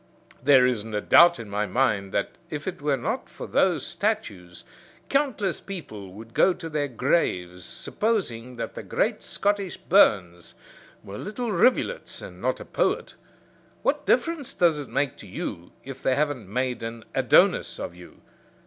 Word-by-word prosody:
There 130 Hz, -1 st, +6 dB
isn't 110 Hz, -3 st, -1 dB
a -, -, +1 dB
doubt 170 Hz, +8 st, +7 dB
in 115 Hz, -, -8 dB
my 105 Hz, +1 st, -1 dB
mind 105 Hz, -3 st, +1 dB
that 100 Hz, -, -1 dB, 0.2 s
if 150 Hz, +1 st, -5 dB
it 185 Hz, -, -4 dB
were 145 Hz, -2 st, +1 dB
not 220 Hz, -, -3 dB
for -, -, -8 dB
those 170 Hz, -7 st, +2 dB
statues 105 Hz, -, -3 dB, 0.5 s
countless 260 Hz, -10 st, 0 dB
people 110 Hz, -, -8 dB
would 115 Hz, +3 st, -12 dB
go 185 Hz, -, +4 dB
to 165 Hz, -, -7 dB
their 150 Hz, -2 st, -1 dB
graves 90 Hz, -, 0 dB
supposing 125 Hz, -, -2 dB
that 115 Hz, -, -5 dB
the -, -, -6 dB
great -, -, -1 dB
Scottish 200 Hz, -2 st, -1 dB
Burns 90 Hz, -, +3 dB, 0.5 s
were 100 Hz, +1 st, -8 dB
little 220 Hz, +3 st, -4 dB
rivulets, 250 Hz, -, +1 dB
and -, -, -10 dB
not -, -, 0 dB
a -, -, -8 dB
poet. -, -, -1 dB, 0.7 s
What -, -, 0 dB
difference 330 Hz, -5 st, +1 dB
does 165 Hz, -4 st, +3 dB
it 145 Hz, -, -7 dB
make 140 Hz, -2 st, -1 dB
to -, -, -11 dB
you 90 Hz, -1 st, -6 dB
if 135 Hz, -1 st, -9 dB
they 130 Hz, -, +2 dB
haven't 140 Hz, -9 st, -1 dB
made 125 Hz, +2 st, -1 dB
an 115 Hz, -1 st, -6 dB
Adonis -, -, +3 dB
of -, -, -5 dB
you? 90 Hz, 0 st, -15 dB
135 Hz, 160 wpm, -25 LUFS, -, 0.7 s, doubt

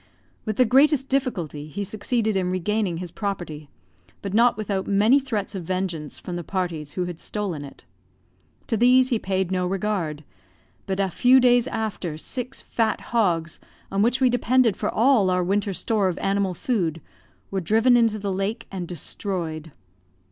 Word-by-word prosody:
With 215 Hz, -2 st, -2 dB
the 255 Hz, -, +4 dB
greatest 270 Hz, +2 st, +4 dB
difficulty 180 Hz, -, -2 dB
he 200 Hz, +7 st, -4 dB
succeeded 215 Hz, +2 st, -1 dB
in 185 Hz, -2 st, 0 dB
regaining 185 Hz, 0 st, -1 dB
his 175 Hz, -1 st, -6 dB
property, 175 Hz, -8 st, -5 dB, 0.5 s
but 200 Hz, -1 st, -4 dB
not 235 Hz, +1 st, +4 dB
without 200 Hz, -3 st, -2 dB
many 210 Hz, +7 st, +4 dB
threats 225 Hz, -7 st, -3 dB
of 190 Hz, -, -4 dB
vengeance 175 Hz, -4 st, -3 dB
from 180 Hz, -, -6 dB
the 175 Hz, -, -5 dB
parties 165 Hz, -4 st, -3 dB
who 180 Hz, -, -1 dB
had 175 Hz, -2 st, -6 dB
stolen 190 Hz, -8 st, -3 dB
it. 140 Hz, -, -12 dB, 0.8 s
To -, -, -1 dB
these 250 Hz, +3 st, +5 dB
he 235 Hz, -4 st, +1 dB
paid 190 Hz, -2 st, -1 dB
no 180 Hz, -1 st, 0 dB
regard; 180 Hz, -6 st, -2 dB, 0.6 s
but 190 Hz, 0 st, -2 dB
a 195 Hz, -2 st, +1 dB
few 255 Hz, +6 st, +5 dB
days 245 Hz, -1 st, +4 dB
after, 200 Hz, -10 st, -3 dB
six 250 Hz, +9 st, -5 dB
fat 225 Hz, -2 st, 0 dB
hogs, 170 Hz, -8 st, +1 dB, 0.3 s
on 195 Hz, -, +1 dB
which 240 Hz, +4 st, +2 dB
we 255 Hz, -2 st, +4 dB
depended 245 Hz, -2 st, +3 dB
for 210 Hz, -, -2 dB
all 230 Hz, -4 st, +3 dB
our 180 Hz, 0 st, +2 dB
winter 200 Hz, +2 st, 0 dB
store 205 Hz, +1 st, 0 dB
of 180 Hz, -, -2 dB
animal 195 Hz, -2 st, 0 dB
food, 170 Hz, -8 st, -1 dB, 0.5 s
were 195 Hz, -1 st, -1 dB
driven 225 Hz, +8 st, +4 dB
into 230 Hz, -3 st, +3 dB
the 200 Hz, -2 st, -3 dB
lake, 195 Hz, +4 st, -2 dB
and 185 Hz, -3 st, -5 dB
destroyed. 165 Hz, -2 st, -4 dB
200 Hz, 170 wpm, -24 LUFS, 180-230 Hz, 0.8 s, these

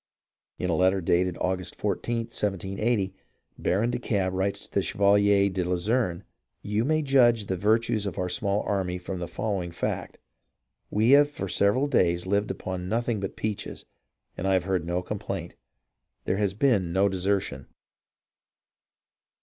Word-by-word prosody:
In 90 Hz, -, -1 dB
a -, -, +2 dB
letter 95 Hz, +3 st, +3 dB
dated 90 Hz, 0 st, +1 dB
August 90 Hz, -1 st, -2 dB
14th, 115 Hz, -1 st, -2 dB
1780, 100 Hz, +1 st, -1 dB, 0.5 s
Baron 110 Hz, +6 st, +1 dB
de -, -, -2 dB
Kalb 95 Hz, -6 st, 0 dB
writes 95 Hz, +1 st, -1 dB
to -, -, -15 dB
the -, -, +2 dB
Chevalier 100 Hz, 0 st, +3 dB
de 95 Hz, -2 st, -1 dB
la 90 Hz, +1 st, -1 dB
Luzerne: 95 Hz, -1 st, 0 dB, 0.4 s
"You 105 Hz, +2 st, 0 dB
may 155 Hz, +3 st, +1 dB
judge 125 Hz, -5 st, +4 dB
of 100 Hz, -, -10 dB
the 95 Hz, -, +1 dB
virtues 110 Hz, +2 st, +1 dB
of 90 Hz, -, -5 dB
our 90 Hz, -, -1 dB
small 100 Hz, 0 st, 0 dB
army 95 Hz, -3 st, -1 dB
from 90 Hz, +1 st, -5 dB
the 85 Hz, -, -4 dB
following 95 Hz, 0 st, -2 dB
fact: 85 Hz, -, -4 dB, 0.7 s
we 110 Hz, +4 st, +3 dB
have 145 Hz, +1 st, +7 dB
for 120 Hz, -9 st, -5 dB
several 100 Hz, +9 st, +2 dB
days 90 Hz, -11 st, +2 dB
lived 100 Hz, +2 st, 0 dB
upon 90 Hz, -1 st, -4 dB
nothing 115 Hz, 0 st, 0 dB
but 95 Hz, -1 st, -4 dB
peaches, 105 Hz, -1 st, -4 dB, 0.5 s
and 95 Hz, -, -3 dB
I 95 Hz, -, +3 dB
have 95 Hz, -3 st, +2 dB
heard 90 Hz, -3 st, -1 dB
no 90 Hz, +1 st, -1 dB
complaint. 95 Hz, -3 st, -5 dB, 0.7 s
There 95 Hz, -, 0 dB
has 100 Hz, -2 st, 0 dB
been 105 Hz, -8 st, +2 dB
no 95 Hz, +3 st, +3 dB
desertion." 95 Hz, -8 st, -1 dB
100 Hz, 160 wpm, -27 LUFS, 90-110 Hz, 0.7 s, have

